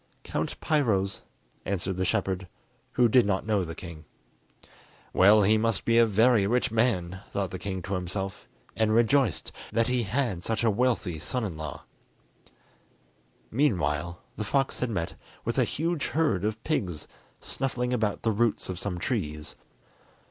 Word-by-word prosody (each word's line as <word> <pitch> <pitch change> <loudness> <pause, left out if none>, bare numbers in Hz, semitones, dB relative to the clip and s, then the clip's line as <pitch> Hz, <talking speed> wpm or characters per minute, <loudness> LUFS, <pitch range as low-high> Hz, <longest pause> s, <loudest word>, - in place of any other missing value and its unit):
"Count - - -3
Piro's," 110 -11 +1 0.4
answered 95 -1 -2
the 95 +1 -1
shepherd, 95 0 -1 0.5
who 120 - +5
did 125 +2 +5
not 100 -1 0
know 105 -3 +1
the 80 -1 -6
king. 85 -4 -9 1.1
"Well, 105 +3 +6
he 110 +3 +4
must 115 -2 0
be 115 0 +4
a 115 - +6
very 110 0 +4
rich 125 +1 +1
man," 95 -6 +1
thought 100 -3 -2
the 95 - -5
king 95 -1 -4
to 100 - -4
himself, 95 +1 -4 0.3
and 110 -1 +2
rejoiced 120 - +2 0.2
that 115 0 +2
he 125 -1 +2
had 110 -4 -1
such 110 +2 -1
a 115 - +4
wealthy 105 -7 0
son 115 +11 -2
in 95 -6 -4
law. 80 -2 -6 1.7
Meanwhile 85 - 0 0.2
the 105 - -2
fox 135 +6 0
had 125 - -1
met 85 -6 -2 0.3
with - - 0
a - - +5
huge 165 0 -1
herd 115 - +1
of 110 +1 -2
pigs, 95 - -2 0.3
snuffling 125 -2 -2
about 110 -4 0
the 115 - +2
roots 110 -1 0
of 90 -1 -4
some 95 -3 -3
trees. 80 - -3
105 Hz, 155 wpm, -28 LUFS, 95-120 Hz, 1.7 s, Well